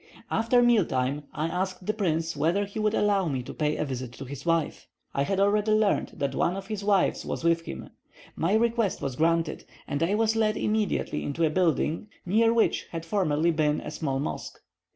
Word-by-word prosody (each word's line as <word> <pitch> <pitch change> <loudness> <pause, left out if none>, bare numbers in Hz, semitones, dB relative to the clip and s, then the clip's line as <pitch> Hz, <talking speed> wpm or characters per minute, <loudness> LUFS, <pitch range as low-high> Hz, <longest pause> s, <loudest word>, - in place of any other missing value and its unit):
After 235 +2 +3
meal 240 -4 +5
time, 135 +1 -2
I 155 - -2
asked 180 +2 -3
the 215 - 0
prince 165 -6 -1
whether 170 +8 +1
he 200 +2 -7
would 215 0 +1
allow 200 -3 +2
me 130 -4 -2
to - - -8
pay 150 0 0
a - - -1
visit 130 -3 -5
to 135 - -8
his 140 +4 -8
wife, 165 -2 0 0.3
I 140 - 0
had 190 +7 0
already 210 +2 +3
learned 215 -1 +1
that 140 - -2
one 180 - +1
of 195 - -6
his 210 0 -5
wives 200 -2 +2
was - - -4
with 165 0 +2
him. - - -7 0.4
My 175 +6 +1
request 230 -2 +1
was 135 -2 -2
granted, 165 +1 +1 0.2
and 145 - -2
I 175 +5 +2
was 220 0 +2
led 215 -1 +1
immediately 210 -1 0
into 160 +4 0
a 155 - +1
building, 165 +1 +1 0.2
near 225 +5 +3
which 230 -1 +1
had 165 -1 -6
formerly 165 -3 +1
been 150 -2 +1
a - - -7
small 135 -4 -2
mosque. 140 - -4
175 Hz, 205 wpm, -27 LUFS, 155-210 Hz, 0.4 s, meal